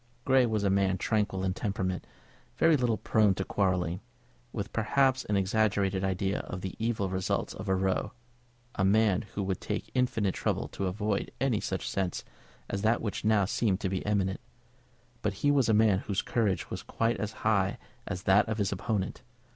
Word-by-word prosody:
Grey 130 Hz, -2 st, +4 dB
was 110 Hz, -2 st, 0 dB
a 100 Hz, -, +2 dB
man 95 Hz, -1 st, +2 dB
tranquil 100 Hz, -2 st, 0 dB
in 95 Hz, -1 st, 0 dB
temperament, 95 Hz, -2 st, -2 dB, 0.5 s
very 165 Hz, -1 st, +5 dB
little 120 Hz, -5 st, +1 dB
prone 105 Hz, -1 st, +3 dB
to 95 Hz, -, -3 dB
quarrelling, 90 Hz, -3 st, 0 dB, 0.5 s
with -, -, -5 dB
perhaps 130 Hz, +3 st, +2 dB
an 105 Hz, -, +1 dB
exaggerated 100 Hz, -1 st, +1 dB
idea 95 Hz, +1 st, 0 dB
of 90 Hz, -, -6 dB
the 95 Hz, -, -4 dB
evil 110 Hz, -3 st, 0 dB
results 95 Hz, 0 st, -1 dB
of 95 Hz, -, -6 dB
a 95 Hz, -, +3 dB
row, 95 Hz, 0 st, 0 dB, 0.6 s
a 95 Hz, -, -1 dB
man 100 Hz, -1 st, +4 dB
who 100 Hz, -, -1 dB
would 95 Hz, -1 st, -2 dB
take -, -, -4 dB
infinite 115 Hz, -7 st, +1 dB
trouble -, -, -1 dB
to 95 Hz, -, -3 dB
avoid 105 Hz, +2 st, -1 dB
any 125 Hz, -5 st, +1 dB
such 95 Hz, -2 st, -3 dB
scene 95 Hz, -2 st, 0 dB, 0.6 s
as 100 Hz, -, -3 dB
that 110 Hz, +2 st, +3 dB
which 105 Hz, -, -4 dB
now 105 Hz, -2 st, +3 dB
seemed 100 Hz, 0 st, 0 dB
to 95 Hz, -, -1 dB
be 95 Hz, 0 st, -1 dB
imminent; 100 Hz, 0 st, -1 dB, 0.8 s
but 105 Hz, -, 0 dB
he 145 Hz, -, +6 dB
was 135 Hz, -5 st, +3 dB
a -, -, +5 dB
man 105 Hz, -3 st, +4 dB
whose 100 Hz, -1 st, -2 dB
courage 105 Hz, -6 st, 0 dB
was -, -, -4 dB
quite 115 Hz, +1 st, -1 dB
as 105 Hz, 0 st, -3 dB
high 100 Hz, -3 st, +2 dB, 0.3 s
as 90 Hz, -, -4 dB
that 100 Hz, +4 st, +4 dB
of 110 Hz, -, -1 dB
his 100 Hz, -3 st, 0 dB
opponent. 100 Hz, 0 st, -2 dB
100 Hz, 185 wpm, -29 LUFS, 95-110 Hz, 0.8 s, he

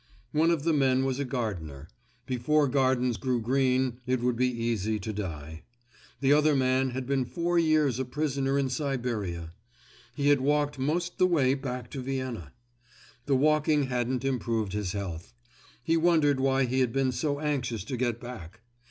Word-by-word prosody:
One 160 Hz, +2 st, +3 dB
of 165 Hz, -4 st, +1 dB
the 165 Hz, 0 st, +2 dB
men 135 Hz, -2 st, +2 dB
was 135 Hz, 0 st, -1 dB
a 140 Hz, -, -1 dB
gardener; 90 Hz, -, -4 dB, 0.4 s
before 145 Hz, +4 st, +1 dB
gardens 130 Hz, -3 st, +1 dB
grew 125 Hz, +4 st, 0 dB
green 130 Hz, +1 st, +1 dB
it 130 Hz, 0 st, +1 dB
would 125 Hz, 0 st, 0 dB
be 125 Hz, +2 st, +2 dB
easy 115 Hz, -3 st, -1 dB
to 105 Hz, +2 st, -5 dB
die. 80 Hz, -6 st, -6 dB, 0.6 s
The 140 Hz, +1 st, +4 dB
other 150 Hz, 0 st, +4 dB
man 130 Hz, 0 st, +2 dB
had 130 Hz, +1 st, -4 dB
been 135 Hz, 0 st, +1 dB
four 170 Hz, +6 st, 0 dB
years 155 Hz, -6 st, +2 dB
a 130 Hz, -, -1 dB
prisoner 140 Hz, 0 st, -1 dB
in 135 Hz, -2 st, +1 dB
Siberia. 115 Hz, -, -3 dB, 0.6 s
He 145 Hz, -1 st, +1 dB
had 145 Hz, -2 st, +4 dB
walked 145 Hz, 0 st, +1 dB
most 170 Hz, +6 st, -1 dB
the 185 Hz, -, +5 dB
way 140 Hz, -7 st, +3 dB
back 125 Hz, -3 st, -4 dB
to 135 Hz, -, -5 dB
Vienna. 130 Hz, -, -4 dB, 0.8 s
The 140 Hz, -, +3 dB
walking 150 Hz, +1 st, +3 dB
hadn't 125 Hz, +2 st, -1 dB
improved 115 Hz, -6 st, -1 dB
his 105 Hz, -3 st, -2 dB
health. 95 Hz, +1 st, -6 dB, 0.5 s
He 165 Hz, +6 st, +2 dB
wondered 160 Hz, -5 st, +3 dB
why 135 Hz, 0 st, +2 dB
he 130 Hz, +2 st, 0 dB
had 125 Hz, -3 st, +2 dB
been 135 Hz, 0 st, +1 dB
so 145 Hz, +3 st, -1 dB
anxious 125 Hz, -8 st, -2 dB
to 125 Hz, +5 st, -4 dB
get 120 Hz, -2 st, -1 dB
back. 115 Hz, -7 st, -9 dB
130 Hz, 170 wpm, -28 LUFS, 120-145 Hz, 0.8 s, the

